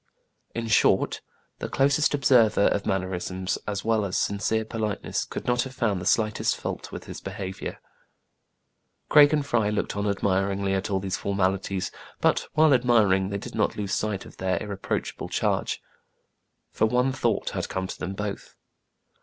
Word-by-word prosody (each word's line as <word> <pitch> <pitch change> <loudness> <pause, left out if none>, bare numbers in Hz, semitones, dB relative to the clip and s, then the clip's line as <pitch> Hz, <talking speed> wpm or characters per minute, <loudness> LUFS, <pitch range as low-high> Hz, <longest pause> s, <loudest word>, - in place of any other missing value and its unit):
In 115 0 -2
short, 110 - +3 0.4
the - - -4
closest 140 +2 +3
observer 125 -7 +4
of 100 - -1
mannerisms 95 0 -2
as 100 -1 -3
well 110 -2 +2
as 100 -2 -1
sincere 110 +2 0
politeness 110 -2 -2
could - - -6
not 120 0 +2
have 130 0 -6
found 105 -7 0
the 95 - -3
slightest 110 0 +2
fault - - -5
with - - -7
his - - -8
behavior. 95 -1 -5 1.3
Craig 145 -1 +8
and 150 -2 +1
Fry 115 -6 +1
looked 105 0 -2
on 100 0 -1
admiringly 95 0 0
at 95 +1 -1
all 95 -1 +1
these 95 0 -2
formalities: 95 -1 -1 0.3
but, - - +2
while 155 -1 +5
admiring, 110 -7 +3
they 100 - -2
did 100 - -8
not 105 - 0
lose 100 -2 -2
sight 105 -3 -1
of - - -14
their 95 0 0
irreproachable 100 -2 -4
charge; - - -1 0.9
for 110 - +2
one 125 +3 +2
thought 130 - 0
had - - -3
come 95 0 -2
to - - -7
them 95 +1 -4
both. 105 0 -5
105 Hz, 160 wpm, -26 LUFS, 95-115 Hz, 1.3 s, Craig